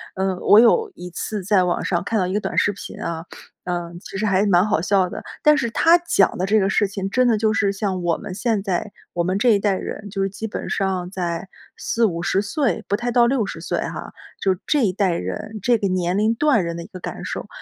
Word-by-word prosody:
嗯， 190 -1 -1
我 205 - +5
有 445 - +4
一 180 - -8
次 205 +3 -4
在 190 -1 +3
网 175 - -1
上 175 -2 0
看 225 - 0
到 185 - +2
一 185 - -3
个 210 - +1
短 - - -4
视 205 - +3
频 200 - -9
啊， 165 0 -4 0.4
嗯， 175 -1 -4
其 195 - -11
实 215 - -1
还 200 0 +2
蛮 180 -1 +4
好 215 -5 +1
笑 190 -2 +2
的， - - -6 0.2
但 300 0 +6
是 235 -5 0
它 330 +8 +5
讲 335 - +2
的 185 - 0
这 215 +2 +3
个 195 - +1
事 205 - +2
情 195 0 -4
真 255 +3 +2
的 225 -2 +3
就 215 0 +1
是 200 -2 +2
像 195 -2 -2
我 170 -1 +1
们 185 - -7
现 220 0 0
在 195 +1 -2 0.2
我 170 - 0
们 185 +2 0
这 240 +4 +3
一 205 -3 +5
代 200 -1 +1
人， 205 +2 -6
就 195 0 -3
是 195 - +1
基 220 +3 -6
本 - - -5
上 185 -2 -1
在 175 0 -3 0.3
40，50 195 -4 0
岁， 220 - -1
不 205 - +1
太 240 +2 -2
到 240 -1 +5
60 235 -5 -1
岁 - - -2
哈， - - -5 0.3
就 190 -1 +3
是 180 - -11
这 285 -6 +3
一 185 - 0
代 195 -2 +1
人， 130 - -5
这 240 +2 +3
个 200 - -1
年 185 0 0
龄 215 +2 +2
段 270 - +3
人 170 0 -4
的 170 - -6
一 - - -11
个 185 - -10
感 - - -6
受。 - - -5
195 Hz, 260 characters per minute, -22 LUFS, 180-220 Hz, 0.4 s, 但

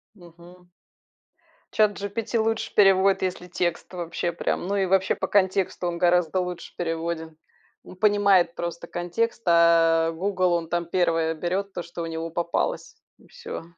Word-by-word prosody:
Мгм. 175 0 -17 1.1
СhatGPT 210 +2 0
лучше 225 0 -1
переводит, 195 -1 +4
если 180 -1 -3
текст 175 0 -3
вообще 170 0 -3
прям, 170 +1 -2
ну 200 - -1
и 195 -1 +1
вообще 190 0 +2
по - - -3
контексту 190 -2 +1
он 170 - -3
гораздо 175 0 +2
лучше 180 -1 -5
переводит. 165 -1 -4 0.5
Он - - -12
понимает 200 -4 +3
просто 170 0 -5
контекст, 220 +7 -2
а, 165 -1 +4
"Гугл", 185 +1 0
он 165 -1 -2
там 175 0 -1
1 165 -2 +1
берет 190 +4 -3
то, 175 - -4
что 170 0 -8
у - - -3
него 165 0 -4
попалось 170 - -2 0.2
и - - -21
всё. 475 - -8
175 Hz, 150 wpm, -25 LUFS, 170-195 Hz, 1.1 s, переводит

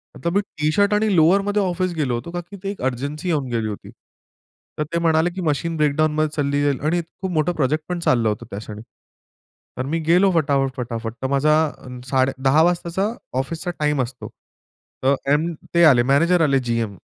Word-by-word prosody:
आता 170 - -2
मी 200 - +3
टी-शर्ट 200 +4 0
आणि 210 -2 +2
लोवरमध्ये 200 +5 +3
ऑफिस 185 -1 -1
गेलो 145 -6 -1
होतो, 170 +9 -6
का 175 - -3
की 185 +4 -12
ती 195 - -2
एक 200 - -6
अर्जन्सी 140 +7 -5
येऊन 150 -6 0
गेली 115 -2 -1
होती. 105 -1 -7 0.9
तर 150 - +2
ते 170 - +1
म्हणाले 165 0 +2
की 190 - -4
मशीन 165 +1 -1
ब्रेकडाउनमध्ये 155 +1 +1
चालली 145 -1 0
जाईल 140 -2 +1
आणि 170 +3 +1
खूप 180 +3 -7
मोठं 160 +2 +1
प्रोजेक्ट 155 +2 0
पण 180 -1 -2
चाललं 120 -8 +2
होतं 105 +3 -4
त्याक्षणी. 105 +1 -7 1.0
तर 130 - -2
मी 165 +4 -1
गेलो 185 +3 +5
फटाफट, 140 -4 +2
फटाफट, 115 -2 -4
तर 130 - -1
माझा 145 +3 +3 0.5
साडे 130 0 +2
10:00 140 +4 +4
वाजताचा 175 +4 0 0.3
ऑफिसचा 165 +6 -3
टाईम 150 -2 +1
असतो. 125 +1 -6 0.8
तर 135 +1 +4 0.2
एम 165 +3 +1 0.2
ते 170 0 +4
आले 130 -6 +6
मॅनेजर 170 +5 +4
आले 140 -4 +3
जी-एम. 115 -4 -2
155 Hz, 185 wpm, -21 LUFS, 135-175 Hz, 1.0 s, आले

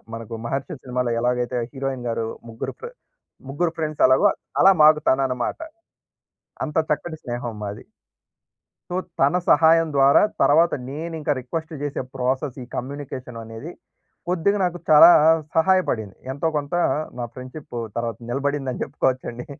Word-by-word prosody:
మనకు 115 0 -8
'మహర్షి' 135 +6 -3
సినిమాలో 125 -1 -2
ఎలాగైతే 125 0 0 0.2
హీరోయిన్ 135 -2 -4
గారు 115 0 -2 0.2
ముగ్గురు 115 - -5
ఫ్రే 470 - -7 0.6
ముగ్గురు 165 +4 0
ఫ్రెండ్స్ 155 -2 -1
ఎలాగో 130 +1 +5 0.3
అలా 195 - +8
మాకు 155 0 +7
తనన్నమాట. 130 - 0 1.1
అంత 150 - -6 0.2
చక్కటి 160 +2 -4
స్నేహం 120 -2 -4
మాది. 105 +1 -6 1.1
సో, 175 - -2 0.2
తన 140 +6 +3
సహాయం 165 +2 +5
ద్వారా 140 0 +6 0.2
తర్వాత 155 +5 +4 0.2
నేనింకా 160 +1 -3
రిక్వెస్ట్ 160 +6 -5
జేసే 145 -1 -3
ప్రాసెస్ 130 +1 -1
ఈ - - -10
కమ్యూనికేషన్ 130 -2 -6
అనేది, 115 +9 -8 0.6
కొద్దిగా 185 +3 +1
నాకు 175 -1 -2
చాలా 155 +3 +9 0.5
సహాయపడింది. 160 - +1 0.2
ఎంతో 140 +4 -2
కొంత 145 +2 -4 0.5
నా - - -2
ఫ్రెండ్షిప్పూ 130 0 -9 0.2
తర్వాత 115 -3 -2
నిలబడిందని 135 0 -2
జెప్పుకోవచ్చండి. 130 -3 -2
135 Hz, 125 wpm, -23 LUFS, 125-160 Hz, 1.1 s, చాలా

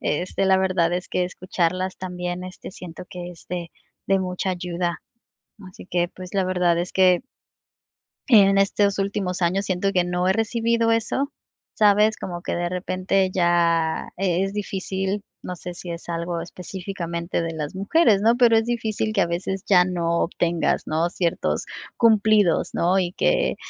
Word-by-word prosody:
este, 180 +5 -1
la 190 0 +5
verdad, 185 -3 +2
es 180 - -3
que 180 - 0
escucharlas 185 0 -2
también, 180 -1 -4
este, 185 +1 -9
siento 180 -2 -9
que 180 -1 -7
es 170 - -14
de 175 -2 -4 0.4
de 195 0 +3
mucha 185 +1 -3
ayuda. 175 -1 -3 0.7
Así 180 - -13
que, 175 -1 0
pues, 185 +1 -10
la 195 -1 +2
verdad 180 -2 +1
es 175 +1 -2
que 185 0 +4 1.1
en 195 -4 +6
estos 200 0 +2
últimos 195 -2 -2
años 190 +3 +1
siento 190 +1 0
que 180 -2 +2
no 180 +1 0
he - - +4
recibido 230 +1 +1
eso, 235 +5 0 0.4
¿sabes? 210 0 +4
Como 175 -1 -6
que - - -3
de 175 0 -1
repente 185 +1 0
ya 170 -2 +1
e 185 -1 +1
es 195 - -5
difícil, 195 0 -3 0.2
no 180 -1 -6
sé 180 +1 -7
si 175 0 -7
es 170 +1 -8
algo 170 0 -3
específicamente 175 -1 -5
de 165 0 -3
las 150 +1 -5
mujeres, 205 - +3
¿no?, 230 +2 +4
pero 235 -2 +5
es 225 - +4
difícil 220 -2 -1
que 205 - 0
a - - +2
veces 185 +2 -3
ya 180 -3 +6
no 170 -2 -1
obtengas, 170 -1 0
¿no?, 165 +2 +1
ciertos 170 -2 -1 0.3
cumplidos, 215 -5 +4
¿no? 180 +3 +2
Y 180 -2 0
que - - +1
185 Hz, 165 wpm, -23 LUFS, 175-195 Hz, 1.1 s, en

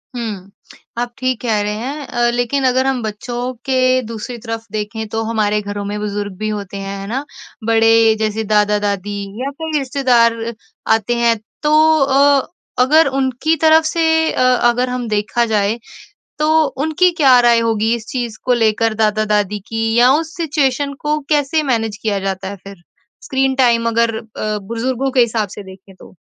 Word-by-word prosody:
हुँ। 205 -5 -5 0.5
आप 240 0 -3
ठीक 255 -2 -2
कह 225 -4 0
रहे 210 0 -2
हैं 275 +6 -5
अ, 240 0 +1
लेकिन 245 +3 -1
अगर 260 +1 +2
हम 265 -2 0
बच्चों 240 +4 -4
के 255 -1 +2
दूसरी 230 +2 -7
तरफ 225 0 -6
देखें 215 +1 -4
तो 225 +1 -2
हमारे 215 -2 0
घरों 205 0 -5
में 205 +1 -4
बुज़ुर्ग 205 -1 -4
भी 215 +2 -3
होते 200 -2 -5
हैं, 195 0 -5
है 195 - -7
ना? 265 +6 -3 0.4
बड़े 225 0 +4
जैसे 220 0 -1
दादा-दादी 205 -1 0 0.2
या 270 - -2
कोई 320 -1 -2
रिश्तेदार 255 -4 +2 0.6
आते 225 +2 -1
हैं, 235 -1 +3 0.3
तो 310 +1 +4
अ, 275 0 +3 0.4
अगर 310 +4 +4
उनकी 270 +3 0
तरफ 320 0 +6
से 320 0 +2
अ, - - -1 0.3
अगर 250 +1 0
हम 250 -1 -3
देखा 215 +3 0
जाए, 215 0 0 0.6
तो 315 +1 +3
उनकी 315 +6 +1
क्या 265 -6 +6
राय 240 -1 +4
होगी 225 0 +1
इस 235 -2 -6
चीज़ 240 -4 -4
को 250 - +2
लेकर 225 -1 +1
दादा-दादी 210 -1 +1
की 225 0 -1
या 245 +1 +6
उस 315 +3 -1
सिचुएशन 285 -4 0
को 300 0 0
कैसे 300 +1 +1
मैनेज 225 -6 -1
किया 210 -3 0
जाता 190 -1 -3
है 200 - -6
फिर? 195 -3 -12 0.4
स्क्रीन 265 -1 0
टाइम 235 -3 +3
अगर 230 0 +1
अ, 215 -1 -4
बुज़ुर्गों 235 +6 -2
के 260 - +2
हिसाब 225 -3 +1
से 205 - -7
देखें 190 0 -14
तो? 185 - -16
230 Hz, 170 wpm, -17 LUFS, 215-265 Hz, 0.6 s, तरफ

